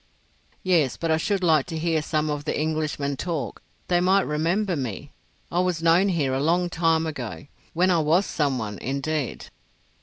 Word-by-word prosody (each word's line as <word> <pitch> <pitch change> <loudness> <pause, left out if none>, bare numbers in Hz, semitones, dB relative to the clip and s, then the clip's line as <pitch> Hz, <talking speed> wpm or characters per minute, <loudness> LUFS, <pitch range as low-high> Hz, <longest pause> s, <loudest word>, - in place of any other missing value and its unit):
"Yes; 165 -9 +2
but 165 -1 -1
I 160 - +3
should 195 +3 -1
like 155 -5 +3
to 165 -2 -4
hear 160 -1 0
some 155 0 -1
of 145 -1 -3
the - - -1
Englishmen 155 -3 -1
talk. 150 - -4 0.3
They 175 -1 +2
might 190 +2 +3
remember 170 +6 0
me. 125 - -5 0.4
I 175 - +1
was 180 -3 0
known 170 +4 +4
here 150 -7 0
a 135 - 0
long 175 +3 +1
time 165 -1 +2
ago—when 150 - -3
I 170 - +3
was 160 +5 +3
some 140 -4 0
one 105 -4 -5
indeed." 140 +1 -3
160 Hz, 175 wpm, -24 LUFS, 145-175 Hz, 0.4 s, known